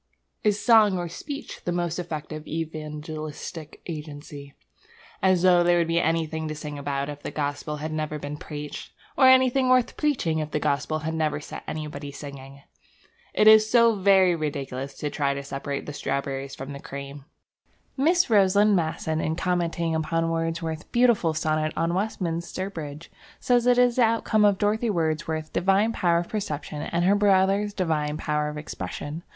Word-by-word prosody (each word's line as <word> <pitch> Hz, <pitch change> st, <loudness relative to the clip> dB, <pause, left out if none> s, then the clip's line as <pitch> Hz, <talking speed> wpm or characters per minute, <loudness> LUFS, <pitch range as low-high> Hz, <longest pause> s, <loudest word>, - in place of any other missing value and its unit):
Is 210 Hz, -1 st, +2 dB
song 215 Hz, -5 st, +5 dB
or 175 Hz, -1 st, -3 dB
speech 280 Hz, -, -7 dB
the 175 Hz, -, -2 dB
most 175 Hz, -1 st, -1 dB
effective 155 Hz, -2 st, -6 dB
evangelistic 155 Hz, 0 st, -6 dB
agency? 145 Hz, -3 st, -8 dB, 0.7 s
As 185 Hz, -2 st, +3 dB
though 180 Hz, -1 st, +6 dB
there 175 Hz, 0 st, +4 dB
would 170 Hz, -1 st, +2 dB
be 165 Hz, +1 st, +2 dB
anything 160 Hz, -1 st, -1 dB
to 155 Hz, -, -4 dB
sing 150 Hz, -1 st, -6 dB
about 140 Hz, -1 st, -2 dB
if 145 Hz, -1 st, -7 dB
the -, -, -5 dB
gospel 145 Hz, 0 st, -3 dB
had 155 Hz, +2 st, -5 dB
never 155 Hz, -1 st, -2 dB
been 145 Hz, 0 st, -6 dB
preached! 150 Hz, -1 st, -7 dB, 0.2 s
Or 260 Hz, -, +6 dB
anything 260 Hz, 0 st, +5 dB
worth 255 Hz, -1 st, +3 dB
preaching 250 Hz, -, 0 dB
if 155 Hz, -1 st, -3 dB
the 150 Hz, -, -1 dB
gospel 145 Hz, +1 st, 0 dB
had 160 Hz, -, -1 dB
never 155 Hz, -2 st, 0 dB
set 150 Hz, -, -8 dB
anybody 150 Hz, -2 st, -5 dB
singing! 140 Hz, -1 st, -10 dB, 0.7 s
It 215 Hz, -, +4 dB
is 215 Hz, 0 st, +8 dB
so 235 Hz, -1 st, +5 dB
very 190 Hz, -2 st, +4 dB
ridiculous 140 Hz, -4 st, -4 dB
to 150 Hz, -, -4 dB
try 140 Hz, -2 st, 0 dB
to 140 Hz, -, -5 dB
separate 140 Hz, 0 st, -4 dB
the 145 Hz, -, -6 dB
strawberries 140 Hz, -1 st, -3 dB
from 135 Hz, +2 st, -7 dB
the 140 Hz, -, -7 dB
cream. 140 Hz, 0 st, -8 dB, 0.7 s
Miss 335 Hz, +6 st, +3 dB
Rosaline 205 Hz, -1 st, +4 dB
Masson, 160 Hz, -2 st, -1 dB
in 160 Hz, -, -1 dB
commenting 170 Hz, -2 st, -1 dB
upon 165 Hz, +1 st, 0 dB
Wordsworth's 165 Hz, -1 st, -2 dB
beautiful 235 Hz, -10 st, +2 dB
sonnet 155 Hz, 0 st, 0 dB
on 165 Hz, +1 st, +1 dB
Westminster 185 Hz, -1 st, -2 dB
Bridge, 150 Hz, -2 st, -8 dB, 0.3 s
says 245 Hz, -1 st, +2 dB
that 245 Hz, 0 st, +4 dB
it 250 Hz, -, +7 dB
is 245 Hz, 0 st, +1 dB
the -, -, +4 dB
outcome 220 Hz, -1 st, +2 dB
of 200 Hz, -2 st, +4 dB
Dorothy 215 Hz, +3 st, +1 dB
Wordsworth's 160 Hz, -3 st, -1 dB
divine 195 Hz, +5 st, +2 dB
power 170 Hz, -5 st, +2 dB
of 170 Hz, 0 st, -2 dB
perception 150 Hz, -7 st, -4 dB
and 170 Hz, +3 st, -1 dB
her 195 Hz, -, +5 dB
brother's 200 Hz, 0 st, +3 dB
divine 155 Hz, -5 st, -1 dB
power 150 Hz, -1 st, -1 dB
of 150 Hz, -, -7 dB
expression. 150 Hz, +1 st, -6 dB
160 Hz, 170 wpm, -25 LUFS, 150-195 Hz, 0.7 s, is